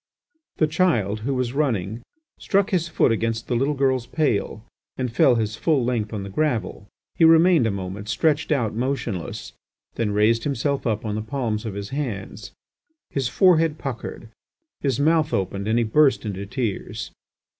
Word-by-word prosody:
The 155 - +4
child, 150 - +1
who 135 +5 -2
was 125 -1 -1
running, 115 -7 -1 0.4
struck 200 +1 +1
his 175 -3 +1
foot 155 - +2
against 115 0 -1
the 125 - 0
little 135 +5 +1
girl's 130 -3 +1
pail, 115 -7 -1 0.3
and 125 -3 -3
fell 125 +1 +5
his 110 -1 -1
full 145 -4 +1
length 115 -4 -1
on 105 -3 -4
the 100 - -7
gravel. 110 -6 -1 0.3
He - - +1
remained 165 -4 +6
a - - +1
moment 100 +1 -5
stretched 150 +4 +1
out 120 -7 +1
motionless, 120 -7 -3 0.4
then 115 -2 0
raised 105 +3 +2
himself 140 -1 -1
up 110 -1 -1
on 105 - -2
the 110 - -2
palms 110 -2 -3
of 100 - -5
his 100 0 -5
hands. 110 -7 -5 0.6
His 135 -3 -1
forehead 165 +1 +3
puckered, 120 -4 -6 0.5
his 135 -4 -1
mouth 155 +1 +2
opened, 100 +1 -2
and 110 +2 +2
he 120 - +3
burst 135 +1 +3
into 100 -1 -4
tears. 110 -2 -4
120 Hz, 165 wpm, -23 LUFS, 105-145 Hz, 0.6 s, remained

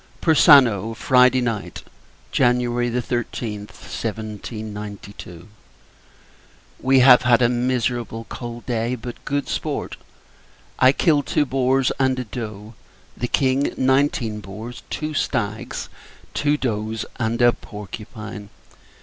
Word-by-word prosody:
X. - - -32
Persano, 130 - +5
Friday 125 +1 +4
Night, 110 -8 -3 0.5
[Jan. 125 0 +3
13th, 120 -2 -2
1792.] 105 -4 -7 1.3
We 130 0 +4
have 125 -1 +8
had 120 0 +4
a - - +6
miserable 120 -2 -1
cold 120 -1 -7
day, 120 0 -1
but 120 0 -9
good 140 0 -1
sport. - - -3 0.8
I 130 - +7
killed 145 -1 +2
two 145 - +2
boars, 130 0 +1
and 130 -1 +2
a 125 - -2
doe; 110 -2 -7 0.4
the 120 - -3
King, 135 +2 +1
nineteen 130 -4 +1
boars, 110 +4 -8
two 155 0 -3
stags, 110 -7 -2 0.5
two 145 0 +1
does, 110 -4 -2
and 115 0 -1
a 120 -1 +5
porcupine. 105 0 -9
120 Hz, 110 wpm, -22 LUFS, 110-130 Hz, 1.3 s, have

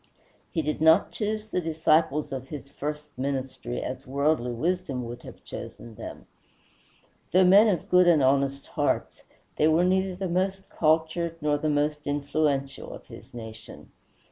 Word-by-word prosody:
He 160 -4 -1
did 150 +1 -2
not 160 +4 +5
choose 215 0 -2
the 180 - -1
disciples 160 -2 +1
of 130 -1 -5
his 140 -1 -8
first 150 0 -6
ministry 130 -2 -3
as 130 +2 -6
worldly 140 -2 +1
wisdom 145 -1 -2
would 120 +1 -7
have - - -12
chosen 115 - -9
them. - - -9 1.1
Though 185 +1 +5
men 200 +5 +7
of 185 -7 0
good 180 0 +5
and 160 -5 +5
honest 140 +1 +2
hearts, - - -2 0.3
they 155 - +4
were 160 +3 +4
neither 190 0 +1
the 190 +1 -3
most 190 +2 -1
cultured 160 +1 +1
nor 150 -1 +1
the 155 - 0
most 150 0 0
influential 145 -1 -1
of - - -10
his - - -13
nation. 110 -2 -10
150 Hz, 155 wpm, -27 LUFS, 140-175 Hz, 1.1 s, men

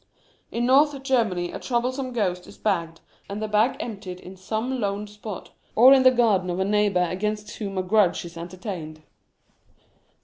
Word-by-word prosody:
In 240 +1 -1
North 280 +2 +4
Germany 215 -10 +1
a - - -6
troublesome 255 +2 -1
ghost 185 -7 -1
is - - -13
bagged, 170 -6 -1 0.3
and 200 +1 -4
the 215 - -2
bag 215 +4 +2
emptied 195 -5 -6
in 185 +1 -11
some 220 +7 -3
lone 200 0 -1
spot, 210 -1 -8 0.2
or 255 +4 +8
in 270 - +6
the 260 - +8
garden 220 -7 +2
of 175 - -2
a 190 - +1
neighbour 205 -3 +2
against 210 +4 -3
whom 200 -3 -5
a 185 - 0
grudge 185 -2 +2
is 170 0 -10
entertained. 170 -2 -7
210 Hz, 170 wpm, -24 LUFS, 185-235 Hz, 0.3 s, or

